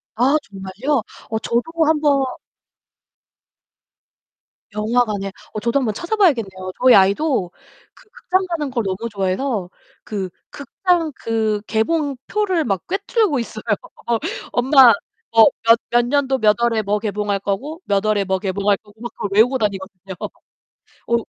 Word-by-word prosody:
아 255 +6 +3
정말요? 210 +4 -3 0.3
어 220 0 -1
저도 235 +2 0 0.2
한번 295 -3 +3 2.5
영화관에 210 -2 0 0.2
어 215 - -3
저도 235 +5 +1
한 260 - -1
번 215 - -1
찾아봐야겠네요. 230 - 0
저희 255 -1 +7
아이도 200 - +2 0.4
그 - - -22
극장 375 -3 -1
가는 320 -5 -2
걸 240 -3 -1
너무 195 +4 -3
좋아해서 195 +1 -2 0.3
그 195 -4 -4 0.2
극장 335 +2 -1
그 220 -2 -1
개봉표를 320 - 0
막 195 -5 -2
꿰뚫고 395 - 0
있어요. 220 -2 -6 0.9
엄마 260 0 +6 0.4
뭐 225 -1 +7 0.2
몇 230 +1 +5
몇 240 0 +3
년도 270 0 +1
몇 215 -2 +4
월에 235 -2 +2
뭐 210 +1 -1
개봉할 205 -1 -2
거고 275 - -4
몇 200 -1 +1
월에 210 -2 +2
뭐 190 0 0
개봉할 200 +1 0
거고 210 +1 -23
막 240 - -5
그걸 205 - -4
외우고 240 +6 +4
다니거든요. 195 -3 -4 0.7
어 235 - -5
230 Hz, 265 characters per minute, -20 LUFS, 200-280 Hz, 2.5 s, 저희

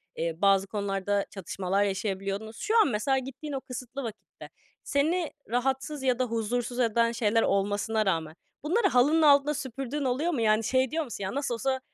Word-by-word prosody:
eee, 165 0 -2
bazı 195 -1 +4
konularda 200 0 -1
çatışmalar 195 0 -1
yaşayabiliyordunuz. 200 +2 -3
Şu 440 +2 +1
an - - +4
mesela 255 +4 +1
gittiğin 270 +3 -6
o 270 - -3
kısıtlı 255 +1 -7
vakitte 225 -2 -9 0.3
seni 315 +4 0 0.2
rahatsız 265 +4 -1
ya 255 -1 +1
da 255 - +2
huzursuz 240 +1 -2
eden 230 0 +2
şeyler 225 -1 +2
olmasına 205 +2 +1
rağmen 160 -4 -1 0.3
bunları 390 +7 +2
halının 295 +4 +4
altında 290 0 +5
süpürdüğün 275 +1 -4
oluyor 275 +7 0
mu? 265 - -1
Yani 215 0 +3
şey 260 +2 +1
diyor 325 0 0
musun, 230 -7 -7
"Ya, 190 +7 -3
nasıl 280 -4 -1
olsa, 260 +3 -1
240 Hz, 170 wpm, -28 LUFS, 205-275 Hz, 0.3 s, altında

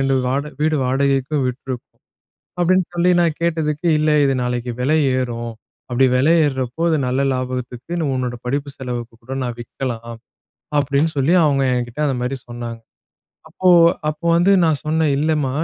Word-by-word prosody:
2 135 0 +2
வாட 140 +2 0 0.2
வீடு 155 -1 +2
வாடகைக்கும் 135 +2 +1
விட்டுருக்கோம்." 125 0 -7 0.6
அப்டின்னு 185 +1 +3
சொல்லி 175 +1 +3
நான் 165 -3 +1
கேட்டதுக்கு, 160 -1 -1
"இல்லை, 155 0 +2
இது 135 - +1
நாளைக்கு 125 0 -2
விலை 150 +5 +2 0.2
ஏறும். 120 -2 -3 0.4
அப்டி 130 +2 +4
வெலை 140 +6 +4
ஏறுறப்போ 130 0 -2
அது 160 - +2
நல்ல 130 +2 0
லாபத்துக்கு, 125 +2 -5 0.2
உன்னோட 125 -1 -2
படிப்பு 140 +2 -2
செலவுக்கு 120 -2 -5
கூட 130 +3 -6
நான் 120 -1 -4
விக்கலாம்." 120 -1 -5 0.6
அப்படின்னு 145 +3 +1
சொல்லி 140 +4 +2
அவுங்க 140 -2 +2
என்கிட்ட 120 +3 -4
அந்த 135 - -1
மாரி 125 +2 -2
சொன்னாங்க. 120 -1 -6 0.7
அப்போ 185 - 0 0.4
அப்போ 155 +2 -4
வந்து 175 +3 +3
நான் 160 -3 +2
சொன்னேன். 155 0 +1
"இல்லைம்மா 150 -3 +1
135 Hz, 150 wpm, -20 LUFS, 125-155 Hz, 0.7 s, அப்டி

